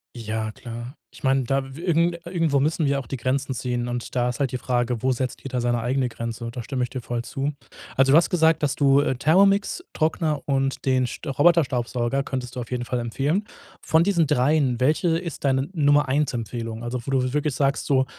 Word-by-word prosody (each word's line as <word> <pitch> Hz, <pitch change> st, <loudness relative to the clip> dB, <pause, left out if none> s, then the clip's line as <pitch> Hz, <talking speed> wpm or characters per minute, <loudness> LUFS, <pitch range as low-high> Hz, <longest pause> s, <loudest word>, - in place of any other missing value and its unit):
Ja, 110 Hz, -1 st, -3 dB
klar. 120 Hz, +3 st, -8 dB, 0.2 s
Ich -, -, -16 dB
meine, 135 Hz, 0 st, +3 dB
da 135 Hz, +1 st, -2 dB
w -, -, -9 dB
irgend 170 Hz, 0 st, +1 dB
irgendwo 165 Hz, -5 st, +1 dB
müssen 155 Hz, +3 st, +1 dB
wir 140 Hz, 0 st, +1 dB
auch 135 Hz, -, -8 dB
die 135 Hz, -, -4 dB
Grenzen 130 Hz, +2 st, -1 dB
ziehen 120 Hz, 0 st, -2 dB
und 120 Hz, 0 st, -5 dB
da 125 Hz, 0 st, +2 dB
ist 125 Hz, -, -5 dB
halt 135 Hz, -4 st, 0 dB
die 125 Hz, -, -3 dB
Frage, 120 Hz, -2 st, -1 dB
wo 130 Hz, +1 st, +2 dB
setzt 125 Hz, 0 st, -3 dB
jeder 130 Hz, -2 st, -3 dB
seine 120 Hz, -1 st, 0 dB
eigene 130 Hz, +2 st, 0 dB
Grenze? 115 Hz, 0 st, -5 dB
Und 115 Hz, -, -6 dB
da 125 Hz, -, -3 dB
stimme 125 Hz, +1 st, -2 dB
ich 125 Hz, -, -4 dB
dir 130 Hz, -, -5 dB
voll 120 Hz, 0 st, -3 dB
zu. 140 Hz, +4 st, -3 dB, 0.4 s
Also, 135 Hz, 0 st, +4 dB
du 150 Hz, -, +8 dB
hast 170 Hz, -, +4 dB
gesagt, 165 Hz, -3 st, +3 dB
dass 145 Hz, -2 st, 0 dB
du, 140 Hz, -1 st, +4 dB
äh, 130 Hz, -, 0 dB
Thermomix, 195 Hz, -, +3 dB
Trockner 155 Hz, -1 st, 0 dB
und 135 Hz, -1 st, -1 dB
den 130 Hz, -1 st, +2 dB
St 120 Hz, -, -8 dB
Roboterstaubsauger 135 Hz, -4 st, +2 dB
könntest 130 Hz, -3 st, -5 dB
du -, -, -3 dB
auf 120 Hz, -, -6 dB
jeden 125 Hz, -1 st, -3 dB
Fall 125 Hz, 0 st, -2 dB
empfehlen. 140 Hz, -, -1 dB, 0.4 s
Von 160 Hz, +1 st, +3 dB
diesen 175 Hz, -4 st, +2 dB
dreien, 130 Hz, -1 st, +2 dB
welche 160 Hz, +5 st, +2 dB
ist 170 Hz, -4 st, -6 dB
deine 135 Hz, +1 st, +1 dB
Nummer 145 Hz, -3 st, +3 dB
1 145 Hz, +3 st, +1 dB
Empfehlung? 115 Hz, -1 st, -5 dB
Also, 120 Hz, +1 st, -3 dB
wo -, -, -5 dB
du 130 Hz, -1 st, +1 dB
wirklich 150 Hz, -2 st, 0 dB
sagst 140 Hz, 0 st, 0 dB
so, 130 Hz, -2 st, +3 dB
135 Hz, 220 wpm, -24 LUFS, 120-150 Hz, 0.4 s, du